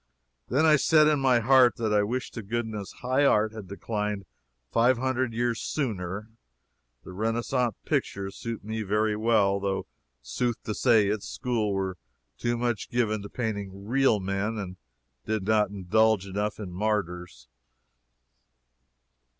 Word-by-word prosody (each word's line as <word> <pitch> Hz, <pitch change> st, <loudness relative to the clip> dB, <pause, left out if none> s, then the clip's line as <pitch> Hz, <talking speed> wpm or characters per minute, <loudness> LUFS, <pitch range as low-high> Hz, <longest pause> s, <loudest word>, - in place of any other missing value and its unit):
Then 140 Hz, +6 st, +3 dB
I 155 Hz, -1 st, +6 dB
said, 155 Hz, +2 st, +5 dB
in 150 Hz, -2 st, +3 dB
my 130 Hz, -3 st, +3 dB
heat, 130 Hz, +1 st, +5 dB
that 110 Hz, -2 st, -1 dB
I 105 Hz, -, +4 dB
"wished 125 Hz, +5 st, -3 dB
to 115 Hz, -, -5 dB
goodness 110 Hz, -1 st, -4 dB
high 130 Hz, +3 st, +2 dB
art 110 Hz, -5 st, +3 dB
had 110 Hz, -4 st, -8 dB
declined 105 Hz, 0 st, -3 dB, 0.5 s
five 120 Hz, +2 st, +4 dB
hundred 130 Hz, -1 st, 0 dB
years 115 Hz, 0 st, -1 dB
sooner." 105 Hz, -, -3 dB, 0.7 s
The 95 Hz, -, -10 dB
Renaissance 115 Hz, +3 st, 0 dB
pictures 95 Hz, 0 st, -2 dB
suit 115 Hz, -2 st, -5 dB
me 110 Hz, +1 st, -3 dB
very 105 Hz, +1 st, +1 dB
well, 105 Hz, -3 st, +2 dB
though 95 Hz, -1 st, -2 dB, 0.4 s
sooth 120 Hz, -, -2 dB
to 105 Hz, -, -3 dB
say 110 Hz, -1 st, +4 dB
its 105 Hz, 0 st, -2 dB
school 115 Hz, -5 st, -1 dB
were 95 Hz, -2 st, -2 dB, 0.4 s
too 120 Hz, 0 st, 0 dB
much 120 Hz, -3 st, -2 dB
given 110 Hz, -3 st, 0 dB
to 100 Hz, -, -8 dB
painting 100 Hz, -4 st, -4 dB
real 125 Hz, -1 st, +3 dB
men 100 Hz, +3 st, -2 dB
and 95 Hz, -3 st, -6 dB, 0.5 s
did 110 Hz, -3 st, -1 dB
not 105 Hz, 0 st, +2 dB
indulge 100 Hz, +1 st, +2 dB
enough 105 Hz, +2 st, -3 dB
in 100 Hz, -4 st, -6 dB
martyrs. 90 Hz, -, -2 dB
110 Hz, 145 wpm, -27 LUFS, 100-120 Hz, 0.7 s, I